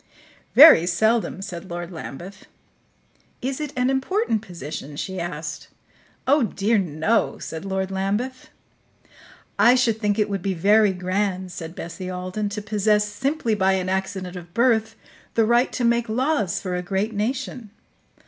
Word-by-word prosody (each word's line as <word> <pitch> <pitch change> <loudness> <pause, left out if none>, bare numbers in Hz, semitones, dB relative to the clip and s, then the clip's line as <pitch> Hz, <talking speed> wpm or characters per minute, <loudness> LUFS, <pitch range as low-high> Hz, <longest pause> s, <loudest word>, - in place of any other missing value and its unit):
"Very 280 - +9
seldom," 220 +2 +1
said 180 0 -7
Lord 175 +1 -5
Lambeth. 175 +4 -9 0.9
"Is 265 +3 -3
it 300 -2 -4
an 250 +1 +2
important 270 - 0
position?" 155 -7 -8
she 190 +5 -4
asked. 160 -2 -5 0.6
"Oh, 285 +3 +4
dear, 215 -1 +1
no," 175 +5 0
said 160 +3 -7
Lord 190 0 -2
Lambeth. 205 +7 -2 1.1
"I 245 +1 +7
should 235 -4 +2
think 205 -2 +1
it 210 -1 +2
would 200 -2 -3
be 190 +1 -1
very 205 +4 +4
grand," 185 0 -2
said 165 -1 -7
Bessie 175 +2 -6
Alden, 185 +3 -3
"to 210 0 -5
possess, 210 0 +2
simply 255 +3 -1
by 190 -2 +2
an 185 -1 -1
accident 190 -1 -3
of 175 -1 -10
birth, 225 -2 +2 0.4
the 225 - +4
right 240 +3 +3
to 250 - -2
make 235 0 +2
laws 250 - 0
for 180 -2 -3
a 180 - -2
great 195 +4 -2
nation." 235 +1 -3
200 Hz, 150 wpm, -23 LUFS, 185-230 Hz, 1.1 s, Very